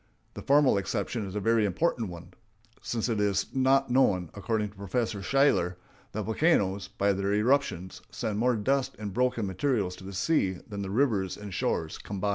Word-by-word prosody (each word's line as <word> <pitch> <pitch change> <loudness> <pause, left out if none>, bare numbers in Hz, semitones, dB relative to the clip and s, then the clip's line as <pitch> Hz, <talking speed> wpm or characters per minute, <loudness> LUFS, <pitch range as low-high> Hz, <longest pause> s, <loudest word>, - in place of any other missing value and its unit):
The - - -7
former 140 -7 +4
exception 100 +2 -3
is 95 - -8
a - - 0
very 115 +1 +2
important 110 - 0
one, 85 +1 -10 0.5
since 115 -1 -2
it 115 -3 -1
is 100 -2 0
now 135 +1 +3
known, 100 -10 +2
according 105 +2 -1
to 100 - -19
Professor 100 +2 -2
Shaler, 105 -8 +2 0.4
that 110 - -2
volcanoes, 100 - +1
by 100 0 +1
their 100 +1 0
eruptions, 105 -6 0
send 105 -1 -3
more 125 +1 +3
dust 135 +5 0
and 105 -2 -5
broken 125 -2 +1
materials 95 -1 -1
to - - -12
the 100 +1 -8
seas 95 - 0
than 100 -2 -5
the 95 - -4
rivers 105 -5 +1
and 105 -2 -8
shores 80 -2 -2
combined. 100 0 -3
105 Hz, 180 wpm, -28 LUFS, 95-125 Hz, 0.5 s, former